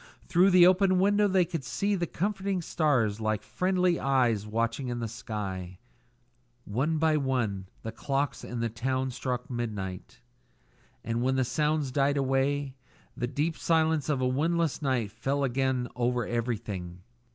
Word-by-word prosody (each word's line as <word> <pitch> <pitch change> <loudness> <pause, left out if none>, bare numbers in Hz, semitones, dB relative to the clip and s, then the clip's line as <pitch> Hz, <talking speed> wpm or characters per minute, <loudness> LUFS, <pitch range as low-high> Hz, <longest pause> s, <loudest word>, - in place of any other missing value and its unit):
Through 175 +3 +4
the 180 -2 +7
open 185 +1 +4
window 205 +2 +4
they 185 -2 +3
could 165 -4 -4
see 200 +10 -1
the 175 -3 -1
comforting 195 0 -2
stars 125 - +1
like 110 -1 -1
friendly 180 -1 +1
eyes 120 -6 +1
watching 115 +4 -1
in 120 -1 -3
the 115 -1 -2
sky. 95 -5 -5 0.9
One 140 +10 0
by 155 0 +3
one 120 -9 -1 0.2
the 110 - -4
clocks 140 +4 -2
of 120 -1 -4
the 115 - 0
town 130 +3 -1
struck 125 0 -3
midnight, 105 -7 -5 0.8
and 115 +1 -1
when 130 +1 +1
the 130 -1 +2
sounds 150 0 0
died 140 +1 +2
away 135 +1 0 0.4
the 120 - -2
deep 150 +5 -1
silence 160 -3 +1
of 140 -3 +1
a 130 - +2
windless 160 +4 0
night 125 -7 0
fell 140 +5 -1
again 130 -1 0
over 120 -1 0
everything. 105 -7 -4
130 Hz, 150 wpm, -28 LUFS, 115-160 Hz, 0.9 s, the